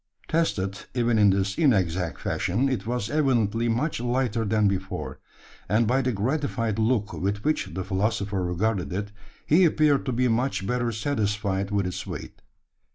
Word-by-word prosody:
Tested, 100 - 0 0.2
even 120 -2 +2
in 105 -1 +6
this 95 0 0
inexact 90 - +1
fashion, 100 +9 0
it 130 -4 -2
was 120 -3 -2
evidently 120 -6 +1
much 125 +7 0
lighter 120 -2 0
than 105 0 +2
before; 95 -1 -3 0.5
and, 110 +4 +3
by 125 +4 +2
the 130 -1 0
gratified 115 -1 -1
look 110 -2 +1
with 100 +2 -2
which 155 +1 +1
the 95 +2 -3
philosopher 100 0 -1
regarded 90 +2 -1
it, 100 +2 -3 0.3
he 170 +5 +5
appeared 150 -4 +3
to - - +1
be 125 +1 +1
much 120 -3 0
better 120 +1 0
satisfied 105 -4 -1
with 100 -2 0
its 90 - -4
weight. - - -7
110 Hz, 160 wpm, -26 LUFS, 100-125 Hz, 0.5 s, in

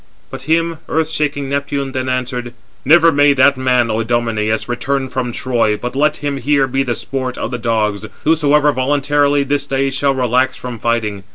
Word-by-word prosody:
But 135 - -9
him 165 0 +1
earth 160 0 0
shaking 145 -3 -2
Neptune 140 0 -2
then 130 -1 -3
answered: 125 -1 -3 0.3
"Never 165 +4 +5
may 145 -1 +4
that 140 +1 +4
man, 125 -3 +1
O 110 - -1
Idomeneus, 115 -2 -1
return 130 +2 -2
from 125 -1 -3
Troy, 115 -4 0
but 125 +3 -6
let 150 +2 +1
him 145 -1 -1
here 140 +1 +2
be 135 +1 -1
the 125 -3 -1
sport 130 -1 -4
of - - -4
the 125 - -4
dogs, 110 -3 -1 0.2
whosoever 150 -2 +3
voluntarily 145 +1 +1
this 145 0 -1
day 135 0 0
shall 135 0 0
relax 130 +1 +1
from 125 -2 -7
fighting. 110 -4 -1
130 Hz, 180 wpm, -16 LUFS, 120-145 Hz, 0.3 s, Never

